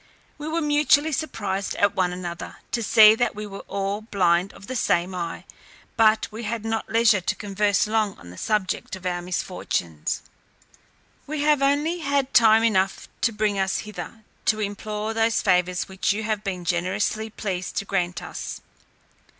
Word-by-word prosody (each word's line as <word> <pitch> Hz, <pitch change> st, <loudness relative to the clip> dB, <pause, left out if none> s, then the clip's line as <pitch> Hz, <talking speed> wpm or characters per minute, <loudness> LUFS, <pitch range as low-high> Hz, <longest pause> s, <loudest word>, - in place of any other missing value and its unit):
We 295 Hz, -, -5 dB
were 330 Hz, +1 st, -1 dB
mutually 295 Hz, 0 st, +3 dB
surprised 205 Hz, -11 st, -2 dB
at 200 Hz, 0 st, +2 dB
one 180 Hz, -1 st, +1 dB
another, 175 Hz, -1 st, -6 dB, 0.2 s
to 235 Hz, -, 0 dB
see 215 Hz, 0 st, +8 dB
that 240 Hz, 0 st, 0 dB
we 210 Hz, +1 st, -5 dB
were 195 Hz, -1 st, -8 dB
all 200 Hz, +1 st, -2 dB
blind 185 Hz, -3 st, +1 dB
of 200 Hz, -, -13 dB
the 260 Hz, -, -5 dB
same 180 Hz, -5 st, +1 dB
eye; 170 Hz, -2 st, -5 dB, 0.5 s
but 220 Hz, -1 st, +4 dB
we 220 Hz, +2 st, -7 dB
had 225 Hz, 0 st, -4 dB
not 225 Hz, 0 st, -2 dB
leisure 225 Hz, -3 st, +4 dB
to -, -, -1 dB
converse 205 Hz, 0 st, +1 dB
long 215 Hz, -2 st, 0 dB
on 85 Hz, -, -12 dB
the 90 Hz, -, -12 dB
subject 210 Hz, -3 st, -1 dB
of 185 Hz, -1 st, -12 dB
our 175 Hz, -1 st, -1 dB
misfortunes. 170 Hz, -, -3 dB, 1.0 s
We 300 Hz, 0 st, -3 dB
have 300 Hz, -2 st, +3 dB
only 295 Hz, +5 st, +2 dB
had 280 Hz, -3 st, 0 dB
time 225 Hz, -1 st, +6 dB
enough 195 Hz, -4 st, +1 dB
to 235 Hz, -, +3 dB
bring 210 Hz, -2 st, 0 dB
us 190 Hz, 0 st, +1 dB
hither, 215 Hz, +1 st, -8 dB, 0.2 s
to 215 Hz, -, +2 dB
implore 210 Hz, +1 st, -3 dB
those 225 Hz, 0 st, +1 dB
favours 180 Hz, -2 st, +2 dB
which 190 Hz, 0 st, 0 dB
you 220 Hz, +2 st, -3 dB
have 215 Hz, -1 st, -2 dB
been 185 Hz, -3 st, -4 dB
generously 185 Hz, +5 st, -1 dB
pleased 185 Hz, -4 st, -4 dB
to 200 Hz, -, -1 dB
grant 180 Hz, -3 st, -1 dB
us. -, -, -6 dB
210 Hz, 170 wpm, -24 LUFS, 185-225 Hz, 1.0 s, see